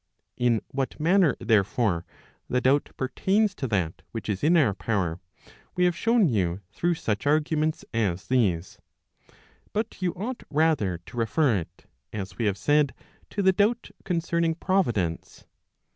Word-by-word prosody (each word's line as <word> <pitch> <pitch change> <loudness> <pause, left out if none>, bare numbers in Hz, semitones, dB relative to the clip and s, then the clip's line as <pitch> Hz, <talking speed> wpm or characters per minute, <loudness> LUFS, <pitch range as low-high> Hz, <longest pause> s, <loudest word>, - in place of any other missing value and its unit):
In 120 -3 +2
what 135 +2 -3
manner, 170 -2 +4
therefore, 105 -4 +1 0.4
the 125 - +2
doubt 135 +3 +2
pertains 195 +10 +1
to 135 - -4
that 90 -7 -1
which 110 -3 -6
is 100 -2 -2
in 170 +4 +5
our 130 -11 +4
power, 95 -5 -1 0.6
we 180 - +3
have 175 -1 +2
shown 225 +2 +3
you 95 - 0
through 175 0 0
such 110 -4 -2
arguments 155 +1 +1
as 100 -6 0
these. 95 -9 0 0.9
But 215 -1 -3
you 180 -2 0
ought 230 +7 -4
rather 145 - +2
to - - -11
refer 120 +3 +2
it, 85 - -8 0.3
as 100 +1 -6
we 115 - +1
have 100 -2 +1
said, 145 -2 +2 0.3
to 200 - -2
the 190 0 +5
doubt 215 +5 +1
concerning 170 -2 0
Providence. 120 - -1
135 Hz, 145 wpm, -26 LUFS, 105-170 Hz, 0.9 s, in